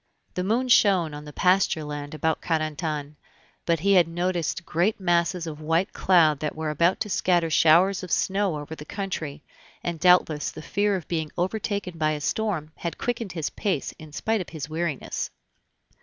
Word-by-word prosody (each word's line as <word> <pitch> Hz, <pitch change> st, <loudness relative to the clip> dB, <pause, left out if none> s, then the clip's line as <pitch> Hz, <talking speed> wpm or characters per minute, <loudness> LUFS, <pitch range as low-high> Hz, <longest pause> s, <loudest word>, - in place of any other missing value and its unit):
The 180 Hz, -, -2 dB
moon 230 Hz, +7 st, +1 dB
shone 190 Hz, -9 st, +4 dB
on 150 Hz, 0 st, -8 dB
the 150 Hz, -, -9 dB
pasture 180 Hz, -1 st, +2 dB
land 145 Hz, 0 st, -6 dB
about 160 Hz, +1 st, 0 dB
Carentan, 155 Hz, -2 st, -2 dB, 0.5 s
but 165 Hz, -2 st, +2 dB
he 200 Hz, +2 st, +3 dB
had 180 Hz, -4 st, +5 dB
noticed 170 Hz, -1 st, -2 dB
great 180 Hz, +7 st, +1 dB
masses 175 Hz, -1 st, +1 dB
of 155 Hz, -2 st, -7 dB
white 165 Hz, +5 st, 0 dB
cloud 160 Hz, -6 st, +4 dB
that 150 Hz, 0 st, -3 dB
were 155 Hz, -1 st, -2 dB
about 170 Hz, +5 st, +2 dB
to -, -, 0 dB
scatter 175 Hz, -4 st, +2 dB
showers 175 Hz, +5 st, +5 dB
of 185 Hz, -, -8 dB
snow 195 Hz, -4 st, +1 dB
over 145 Hz, +2 st, -7 dB
the 155 Hz, -, -8 dB
country, 160 Hz, -5 st, -5 dB, 0.4 s
and 170 Hz, -2 st, -3 dB
doubtless 180 Hz, -4 st, +4 dB
the 155 Hz, -, -9 dB
fear 205 Hz, +3 st, +1 dB
of 180 Hz, -, -5 dB
being 160 Hz, -3 st, -2 dB
overtaken 190 Hz, -1 st, -2 dB
by 155 Hz, 0 st, +2 dB
a 150 Hz, -, -3 dB
storm 175 Hz, -4 st, -1 dB
had 170 Hz, -, -4 dB
quickened 230 Hz, -5 st, -3 dB
his 160 Hz, -4 st, -3 dB
pace 190 Hz, -9 st, -2 dB
in 155 Hz, -1 st, -11 dB
spite 220 Hz, +7 st, -1 dB
of 180 Hz, -, -7 dB
his 155 Hz, -4 st, -6 dB
weariness. 160 Hz, -3 st, -3 dB
170 Hz, 180 wpm, -25 LUFS, 155-190 Hz, 0.5 s, had